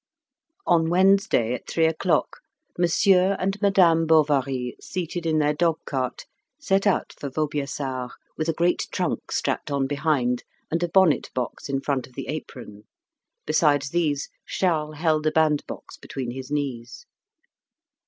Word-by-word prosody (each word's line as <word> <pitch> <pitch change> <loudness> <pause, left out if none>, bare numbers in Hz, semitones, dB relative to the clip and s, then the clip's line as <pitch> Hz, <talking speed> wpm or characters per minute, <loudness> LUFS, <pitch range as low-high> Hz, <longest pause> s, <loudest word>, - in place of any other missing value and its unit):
On 165 -1 +3
Wednesday 190 - +3
at 125 - -6
three 165 - +2
o'clock, 160 0 0 0.4
Monsieur 180 +2 +3
and 195 +2 -2
Madame 175 -5 +4
Bovary, 135 -5 +2
seated 175 -1 -4
in 160 -1 +2
their 150 -1 +2
dog 165 +1 +1
cart, 130 -3 -3 0.3
set 195 -7 +1
out 195 - +1
for 140 - -4
Vaubyessard, 140 -3 -3 0.3
with 155 +1 -2
a - - +2
great 175 +2 +1
trunk - - -2
strapped - - -1
on 140 -1 0
behind 135 -4 0 0.3
and 165 +2 0
a 175 - 0
bonnet 185 -4 +3
box 125 +2 -4
in 135 -1 -1
front 135 -3 -2
of 130 - -22
the 135 - -7
apron. 120 -8 -7 0.6
Besides 145 -3 +2
these 155 -5 0 0.2
Charles 155 -5 -1
held 155 -1 +1
a - - +3
bandbox 155 -2 -1
between 130 -3 -5
his 130 +1 -7
knees. 140 - -4
155 Hz, 145 wpm, -24 LUFS, 135-170 Hz, 0.6 s, Madame